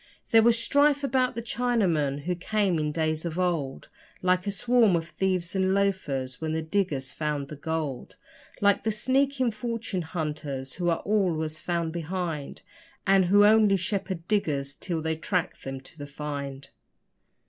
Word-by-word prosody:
There 225 - +7
was 230 0 +5
strife 285 +4 +3
about 260 -3 +1
the 235 - -4
Chinamen, 190 - +1
who 180 +5 -1
came 185 0 0
in 150 0 -1
days 155 0 -1
of 170 -1 -4
old 165 -7 -1 0.4
Like 180 +1 +2
a - - +1
swarm 235 -2 +3
of 165 0 -2
thieves 185 -1 -1
and 190 0 +2
loafers 150 -11 -1
when 160 -1 -2
the 160 0 -1
diggers 155 -7 -1
found 150 -3 -3
the 150 - -6
gold 150 -3 -4 0.5
Like 200 -1 +3
the 220 - +1
sneaking 260 +3 +1
fortune 225 -3 -3
hunters 150 -5 -4
who 175 -1 -1
are 165 - 0
always 165 -7 0
found 170 -1 -2
behind, 170 -3 -4 0.4
And 195 -1 +5
who 205 +3 +6
only 210 -2 +5
shepherd 185 -2 -2
diggers 145 -10 0
till 165 +1 -4
they 160 0 0
track 180 +2 -1
them 135 0 -6
to 130 - -15
the 145 - -6
'find'. 140 -1 -6
175 Hz, 160 wpm, -27 LUFS, 155-205 Hz, 0.5 s, There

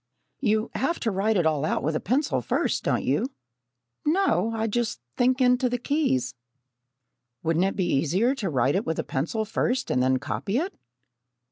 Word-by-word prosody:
"You 220 -3 +1
have 335 +6 -1
to 225 - 0
write 205 +3 +1
it 175 - +2
all 155 -3 +1
out 155 - 0
with 155 +2 0
a - - +1
pencil, 225 - 0
first, - - 0
don't - - 0
you?" 150 - +1 0.7
"No, 310 - +2
I 220 0 -1
just 225 - -1 0.2
think 255 +2 +2
into 250 0 +3
the 245 - -1
keys." 230 - 0 1.1
"Wouldn't 165 +3 +2
it 195 - -1
be 185 - 0
easier 180 - +2
to 220 -9 -3
write 130 -1 +2
it 195 - +1
with 160 - -1
a - - -1
pencil 170 +11 -2
first 250 +4 -1
and 125 - +2
then 130 +1 +3
copy 200 - -2
it?" 365 +7 -1
215 Hz, 180 wpm, -26 LUFS, 155-250 Hz, 1.1 s, into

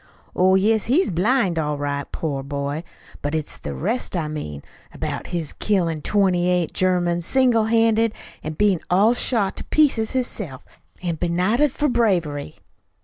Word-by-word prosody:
"Oh, 185 +1 +4
yes, 215 +3 +2
he's 275 - +2
blind, 185 -1 +2
all 150 -1 -1
right, 145 -1 -3
poor 145 -4 -3
boy! 140 +2 -4 0.4
But 145 +2 -2
it's 155 -2 -4
the - - -5
rest 215 +1 -1
I 160 -3 -1
mean 75 - -6 0.3
about - - -4
his 170 -4 -3
killin' 170 -7 0
twenty 185 -1 +2
eight 180 -3 0
Germans 175 -2 +1
single 250 -4 +3
handed, 225 0 +2 0.3
an' 155 - -4
bein' 195 +1 +2
all 205 +6 +4
shot 225 -5 0
to - - -4
pieces 265 -8 +2
hisself, 205 - -3 0.4
an' 170 -2 -2
benighted 185 - +1
for 295 - 0
bravery." 180 - 0
180 Hz, 150 wpm, -22 LUFS, 155-225 Hz, 0.4 s, Oh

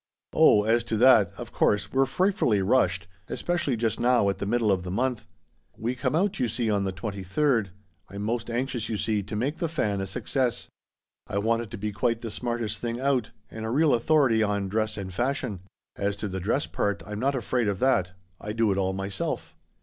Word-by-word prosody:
" - - -64
Oh, 105 - +6
as 115 +2 +2
to 110 - -1
that, 110 -5 +6
of - - -7
course, 105 -1 +1
we're 135 0 +3
frightfully 180 - +2
i - - +1
rushed 95 -4 +2
' 95 - -33
— - - -38
especially 170 -8 -1
just 115 -1 -1
now, 120 -4 +3
at 100 - -2
the 100 - -3
middle 115 -1 +2
of 95 -2 +1
the 90 - -6
month. 115 +2 -1 0.5
We 120 +3 -1
come 130 +4 -1
out, 195 +3 +1
you 125 - +2
see, 115 0 -1
on 100 -1 +1
the 95 - -1
23d. 100 - 0 0.4
I'm 100 +1 -6
most 115 +2 -2
anxious, 120 -1 -2
you 110 - -1
see, 105 0 0
to 105 +2 -6
make 135 +9 -1
The 170 -1 -1
Fa/a 105 -11 -1
a 95 - -3
success. 125 +4 -1 0.6
I - - -3
want 115 +3 +1
it 115 - -7
to 115 - -7
be 105 +1 -3
quite 115 +3 0
the 115 - -5
smartest 115 -3 -2
thing 120 0 -3
out, 130 -4 +1 0.2
and 110 - -7
a 110 - -2
real 150 +5 +3
authority 120 -2 +3
on 100 -2 0
dress 110 +1 -1
and 95 -2 -5
fashion. 120 -2 -1 0.4
As 100 0 -1
to 105 +1 -4
the 95 -1 -4
dress 110 +10 0
part, 100 -1 -2
I'm 105 0 -5
not 135 +3 +1
afraid 125 -1 0
of 100 -2 0
that. 95 -7 +2 0.3
I 105 - -5
do 115 -2 +2
it 95 - 0
all 95 0 0
myself." 95 0 -4
110 Hz, 225 wpm, -26 LUFS, 100-125 Hz, 0.6 s, Oh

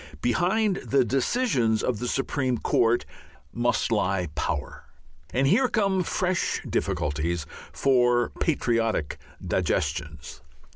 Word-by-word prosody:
Behind 185 - +1
the 135 -2 +1
decisions 130 - +1
of 120 -5 -1
the 125 - -3
Supreme 130 -1 -1
Court 115 +1 +2 0.5
must 120 0 0
lie 95 -5 0
power. - - -3 0.5
And 130 +2 +1
here 225 - +4
come 200 -5 +1
fresh 180 +1 -1
difficulties 75 +2 -1 0.3
for 120 -3 +2
patriotic 115 - 0 0.3
digestions. 75 -1 -2
120 Hz, 100 wpm, -26 LUFS, 110-170 Hz, 0.5 s, here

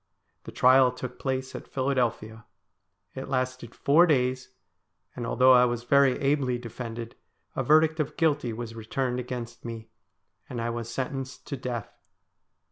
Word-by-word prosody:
The - - -7
trial 130 0 +5
took 125 0 -7
place 130 -1 -2
at - - -8
Philadelphia. 120 -5 -1 0.7
It 130 - -7
lasted 130 -2 -2
four 165 +5 +5
days, 130 -3 +1 0.7
and, 120 -2 -4
although 130 +3 +5
I 125 0 +7
was 120 -1 -2
very 140 +1 +4
ably 135 -3 +1
defended, 115 -1 -7 0.4
a - - 0
verdict 155 +1 +4
of 150 - -2
guilty 150 -7 +1
was 115 0 -6
returned 125 +3 -2
against 120 -1 -6
me, 115 -1 -7 0.6
and 125 - -5
I 115 0 -1
was 115 -1 -5
sentenced 135 0 -5
to 140 - -2
death. 125 -4 -5
125 Hz, 145 wpm, -27 LUFS, 120-135 Hz, 0.7 s, I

